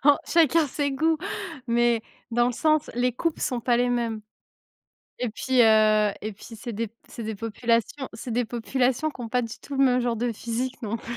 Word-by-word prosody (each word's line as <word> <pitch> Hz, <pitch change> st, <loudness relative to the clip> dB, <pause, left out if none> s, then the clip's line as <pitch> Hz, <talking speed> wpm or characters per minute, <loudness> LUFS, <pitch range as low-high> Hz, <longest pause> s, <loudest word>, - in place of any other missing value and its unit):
en 290 Hz, 0 st, +7 dB
chacun 330 Hz, -1 st, +4 dB
ses 285 Hz, +1 st, -1 dB
goûts 320 Hz, +4 st, +2 dB, 0.5 s
mais, 235 Hz, -1 st, +3 dB, 0.3 s
dans 240 Hz, +1 st, +3 dB
le -, -, -1 dB
sens, 310 Hz, +4 st, +1 dB
les 245 Hz, +1 st, +1 dB
coupes 330 Hz, +4 st, -1 dB
sont 250 Hz, -3 st, -1 dB
pas 240 Hz, 0 st, +2 dB
les 245 Hz, -, +2 dB
mêmes. 235 Hz, -3 st, -1 dB, 1.0 s
Et 250 Hz, -, -1 dB
puis, 255 Hz, +3 st, +2 dB
heu, 215 Hz, -1 st, +5 dB
et 215 Hz, -, -3 dB
puis 195 Hz, -, -17 dB
c'est 225 Hz, +2 st, -6 dB
des 225 Hz, +2 st, -2 dB
p -, -, -40 dB
c'est 235 Hz, -, -8 dB
des 220 Hz, 0 st, -3 dB
populations 230 Hz, +5 st, -1 dB
c'est 225 Hz, +3 st, -7 dB
des 240 Hz, +1 st, 0 dB
populations 250 Hz, +5 st, 0 dB
qui 290 Hz, -, -14 dB
ont 235 Hz, -2 st, -5 dB
pas 250 Hz, +2 st, +1 dB
du 230 Hz, -1 st, -6 dB
tout 285 Hz, -, -7 dB
le 270 Hz, -, +4 dB
même 250 Hz, -1 st, +4 dB
genre 240 Hz, -1 st, 0 dB
de 240 Hz, +2 st, -1 dB
physique 240 Hz, +4 st, -3 dB
non 220 Hz, 0 st, -2 dB
plus. 235 Hz, +1 st, -6 dB
240 Hz, 215 wpm, -25 LUFS, 225-260 Hz, 1.0 s, en